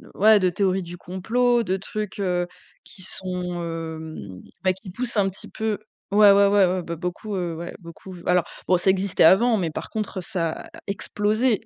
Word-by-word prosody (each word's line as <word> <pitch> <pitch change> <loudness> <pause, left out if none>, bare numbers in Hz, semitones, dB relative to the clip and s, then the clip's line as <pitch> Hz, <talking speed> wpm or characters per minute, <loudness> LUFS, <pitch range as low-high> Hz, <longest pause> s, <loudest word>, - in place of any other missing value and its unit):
ouais, 215 +1 +6
de 185 -2 +3
théories 190 +1 +1
du 175 +1 -8
complot, 235 +8 +1
de 190 -2 0
trucs, 210 +1 -5
heu, 180 -2 0 0.4
qui 190 - -11
sont, 180 -2 -3
hem, 160 - -6 0.2
bah, 185 -1 +3
qui 190 +1 -11
poussent 235 +4 -3
un 195 -1 +3
petit 190 - -8
peu 220 -1 -2 0.3
ouais, 205 0 +7
ouais, 200 0 +6
ouais, 200 -1 +5
ouais, 180 0 0
bah, 170 0 -4
beaucoup, 180 +4 -4
heu, 175 -3 -2
ouais, 170 +2 -6
beaucoup. 175 +2 -11
Alors, 180 -1 +3 0.2
bon, 180 - +4
ça 180 - +2
existait 190 -1 +2
avant, 220 +7 +6
mais 170 -4 -1
par - - -6
contre, 210 -3 -3
ça 170 -2 -1
a - - -9 0.2
explosé 210 +3 0
185 Hz, 190 wpm, -24 LUFS, 175-205 Hz, 0.4 s, ouais